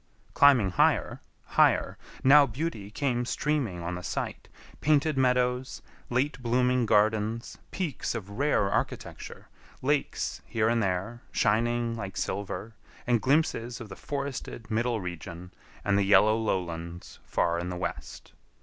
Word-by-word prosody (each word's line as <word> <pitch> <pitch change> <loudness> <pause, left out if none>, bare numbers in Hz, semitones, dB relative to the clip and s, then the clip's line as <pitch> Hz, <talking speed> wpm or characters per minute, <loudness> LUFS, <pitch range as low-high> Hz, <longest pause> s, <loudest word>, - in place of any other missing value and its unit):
Climbing 130 -9 +5
higher, 90 - +2 0.2
higher, - - +3 0.3
now 140 +1 +7
beauty 120 -5 -4
came 125 +1 -1
streaming 125 - -1
on 85 +2 -3
the 90 - -5
sight: - - -4 0.3
painted 150 0 +2
meadows, 125 0 +1 0.3
late 130 +3 0
blooming 125 0 +2
gardens, 110 +2 +1
peaks 160 -10 -3
of 105 -5 -5
rare 130 -3 +1
architecture, - - -4 0.4
lakes 145 +1 -1
here 110 -1 +1
and 115 0 +2
there, 95 +5 -2
shining 115 +2 +1
like 100 -5 -6
silver, 100 +4 -3 0.3
and 120 -3 +2
glimpses 130 -4 +1
of 115 - -9
the - - -8
forested 140 -5 -5
middle 115 +1 0
region 90 0 -7 0.3
and 100 -1 +3
the - - +3
yellow 105 +2 +5
lowlands 85 -5 -3
far 85 0 0
in 90 +1 -4
the 90 - -4
west. 90 - -6
115 Hz, 130 wpm, -28 LUFS, 100-130 Hz, 0.4 s, now